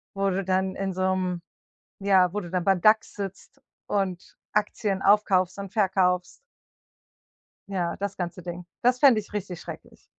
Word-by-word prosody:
wo 195 0 +1
du 195 +1 -1
dann 190 0 0
in 195 0 -2
so 185 - -4
'nem 180 -2 -2 0.6
ja, 190 -3 +4
wo 210 - -1
du 175 - -8
dann 180 -2 -1
beim 195 -2 +3
DAX 220 +2 +4
sitzt 195 -2 -8 0.3
und 190 -3 -2 0.2
Aktien 205 -1 0
aufkaufst 190 -3 +3
und 195 -2 -6
verkaufst. 185 -4 +1 1.3
Ja, 180 -4 -1
das 200 0 -3
ganze 175 0 -4
Ding. 175 0 -6 0.2
Das 250 +1 +3
fände 260 -6 +6
ich 210 - -10
richtig 190 -4 -4
schrecklich. - - -11
190 Hz, 160 wpm, -26 LUFS, 180-200 Hz, 1.3 s, fände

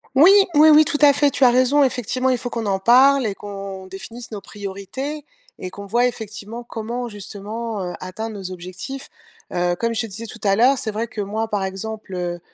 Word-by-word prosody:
Oui, 325 +9 +8 0.2
oui, 305 +2 +7
oui, 305 +1 +8
tout 310 -1 -1
à 290 -1 +8
fait, 285 0 +3
tu 260 - +3
as 245 - +7
raison. 255 +4 +4
Effectivement 255 +1 -1
il 255 - +2
faut 245 0 -4
qu'on 230 -2 -4
en 195 -1 0
parle 260 +5 +5
et 210 - -1
qu'on 195 -2 -8
définisse 225 +5 -9
nos 205 - -6
priorités 205 +10 -6 0.3
et 185 - -6
qu'on 200 +2 -9
voie, 235 +5 +2
effectivement, 220 -1 -5
comment, 235 +2 -4
justement, 210 +1 -6
heu, 180 -1 -4
atteindre 215 +4 -5
nos 190 -2 -6
objectifs, 185 +10 -7 0.4
heu, 175 0 +1
comme 230 0 0
je 225 - +1
te 225 - -4
disais 220 +3 -7
tout - - -9
à 195 -1 +3
l'heure, 260 +4 +5
c'est 220 - -3
vrai 220 +3 -3
que 215 - -5
moi, 215 +3 -2
par 205 -3 -1
exemple, 195 +2 -6
heu, 175 -1 -3
220 Hz, 215 wpm, -21 LUFS, 195-250 Hz, 0.4 s, Oui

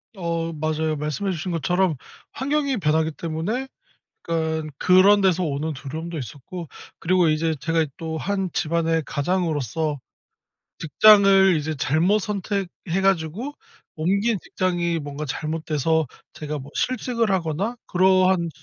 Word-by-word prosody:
어 165 -2 -2
맞아요. 155 0 -1
말씀해 150 +6 -2
주신 175 +1 -4
것처럼 170 +2 +1 0.4
환경이 280 0 0
변하기 160 -2 +1
때문에 170 - -3 0.6
약간 160 -1 -1
그런 190 +4 +5
데서 185 -2 +2
오는 155 0 -2
두려움도 160 +4 -6
있었고 145 - -8 0.3
그리고 180 -1 +3
이제 160 +1 +1
제가 165 +2 +1
또 160 -1 -4
한 195 0 -1
집안의 165 -1 0
가장으로서 155 - -1 0.8
직장을 195 +2 +6
이제 155 +1 -3
잘못 165 +10 +2
선택해 195 -3 -3
가지고 195 - 0 0.4
옮긴 200 +7 +1
직장이 175 -2 -1
뭔가 145 0 -6
잘못돼서 155 +1 -1 0.3
제가 150 -1 -5
뭐 135 - -10
실직을 240 -4 0
하거나 185 +5 -1
그러한 185 -1 +3
165 Hz, 285 characters per minute, -23 LUFS, 155-190 Hz, 0.8 s, 직장을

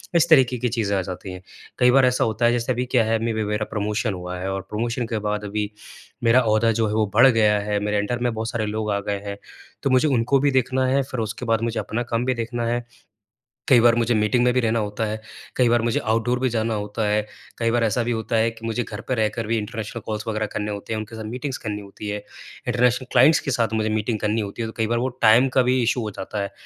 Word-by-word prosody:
इस 170 0 +4
तरीके 130 -5 +5
की 125 +1 -1
चीज़ें 110 -4 -1
आ - - +1
जाती 95 +1 -7
हैं। 90 0 -8 0.4
कई 125 -1 +5
बार 135 0 +5
ऐसा 125 0 +2
होता 110 +1 0
है 120 - +5
जैसे 120 +1 0
अभी 125 0 -1
क्या 125 -2 +2
है? 110 +1 +1
अभी-अभी 110 -1 -1
मेरा 105 +1 -1
प्रमोशन 105 +1 -1
हुआ 90 0 -6
है 95 +2 -3
और 95 0 -3
प्रमोशन 120 +3 -2
के 115 -2 -2
बाद 105 0 -2
अभी 105 0 -3 0.5
मेरा 120 +2 +5
ओहदा 110 0 +3
जो 115 0 +1
है 105 - -2
वो 110 0 +2
बढ़ 120 +4 +8
गया 110 -4 +3
है। 105 0 -1
मेरे 105 0 -1
अंडर 105 +4 -1
में 120 -1 0
बहुत 110 +1 -3
सारे 115 -2 -2
लोग 105 0 -2
आ 100 - 0
गए 100 0 -3
हैं। 100 0 -5 0.5
तो - - +1
मुझे 130 +4 +4
उनको 135 0 +2
भी 140 +1 +2
देखना 130 0 +1
है, 135 +2 +2
फिर 130 -2 -6
उसके 110 +2 -4
बाद 115 -1 +1
मुझे 115 0 -1
अपना 120 +3 -3
काम 120 0 -2
भी 130 - +1
देखना 120 0 -3
है। 120 +1 -1 0.8
कई 130 -4 +6
बार 115 0 +5
मुझे 120 0 +1
मीटिंग 110 +3 +2
में 125 0 +3
भी 130 - +2
रहना 115 -1 +1
होता 105 +1 -2
है 110 0 -4 0.3
कई 125 -2 +3
बार 120 0 +3
मुझे 115 0 0
आउटडोर 115 +3 0
भी 130 0 +1
जाना 115 -1 -1
होता 105 +1 -3
है 105 +1 +2 0.4
कई 115 -1 +1
बार 120 0 +1
ऐसा 115 +2 +1
भी 120 - -2
होता 115 0 -2
है 110 +1 +3
कि 115 0 -11
मुझे 115 +2 -1
घर 105 -2 -7
पर 130 - 0
रहकर 110 +1 -1
भी 115 +1 +1
इंटरनेशनल 105 0 -5
कॉल्स 110 -1 -3
वग़ैरह 110 -1 -1
करने 105 0 -2
होते 100 +2 -5
हैं - - -2
उनके 110 +1 -8
साथ 110 - -6
मीटिंग्स 130 +4 -4
करनी 105 -1 -5
होती 100 +1 -8
हैं। 105 - -2 0.5
इंटरनेशनल 125 +1 +1
क्लाइंट्स 135 +6 +6
के 135 - -3
साथ 115 -3 0
मुझे 110 0 0
मीटिंग 110 +1 -1
करनी 105 +2 0
होती 100 +3 -5
है 115 - -2
तो - - -6
कई 110 -1 +1
बार 120 +1 0
वो 125 - 0
टाइम 115 +4 +6
का 130 - +6
भी 125 +1 +2
इश्यू 120 +1 +1
हो 110 - -3
जाता 100 +2 -5
है 100 - -4
115 Hz, 270 wpm, -23 LUFS, 105-120 Hz, 0.8 s, बढ़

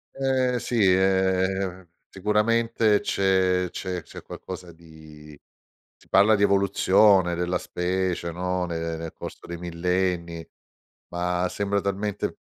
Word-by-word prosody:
Eh 130 -2 +1
sì, 120 - -4 0.2
eh 95 -1 +1 0.2
sicuramente, 105 +2 +1
c'è 95 -1 +1
c'è 90 -3 -5
c'è - - -11
qualcosa 90 -1 -9
di 80 -2 -15 0.6
si - - -24
parla 105 +3 +5
di 100 - +1
evoluzione 100 -1 +4
della 90 +1 -1
specie, 90 -1 -2
no, 90 +1 -2
ne 85 -1 -3
nel 80 0 -6
corso - - -9
dei 85 - -6
millenni, 85 -1 -2 0.6
ma 90 +1 -1
sembra 100 0 -1
talmente 100 +1 -3
95 Hz, 115 wpm, -25 LUFS, 85-100 Hz, 0.6 s, parla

